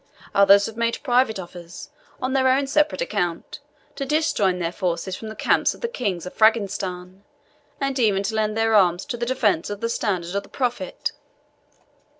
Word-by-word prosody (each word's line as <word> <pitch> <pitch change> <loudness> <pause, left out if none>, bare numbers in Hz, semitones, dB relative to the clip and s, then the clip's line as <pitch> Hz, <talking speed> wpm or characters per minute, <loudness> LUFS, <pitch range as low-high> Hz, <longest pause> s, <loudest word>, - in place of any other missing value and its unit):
Others 200 0 +6
have 225 - -6
made 230 0 0
private 245 -5 +2
offers, 175 +5 -10 0.3
on 255 0 -2
their 265 -1 +3
own 265 +2 +3
separate 275 -8 +1
account, 175 -2 -3 0.4
to 275 - -3
disjoin 270 - +1
their 170 -1 -2
forces 180 0 -2
from 220 - -8
the 220 - -8
camp - - +2
of - - -18
the 470 - 0
Kings 200 - -3
of 180 - -7
Frangistan, 195 -4 +1 0.6
and 275 -1 -1
even 205 -4 +2
to 210 - -2
lend 215 0 0
their 225 0 +2
arms 180 -4 +3
to 285 -4 -4
the 240 0 -3
defence 220 -9 +1
of 205 -1 -5
the 230 - -2
standard 185 -6 -2
of 200 - 0
the 200 - -17
Prophet. 245 -7 -2
210 Hz, 180 wpm, -23 LUFS, 185-245 Hz, 0.6 s, Others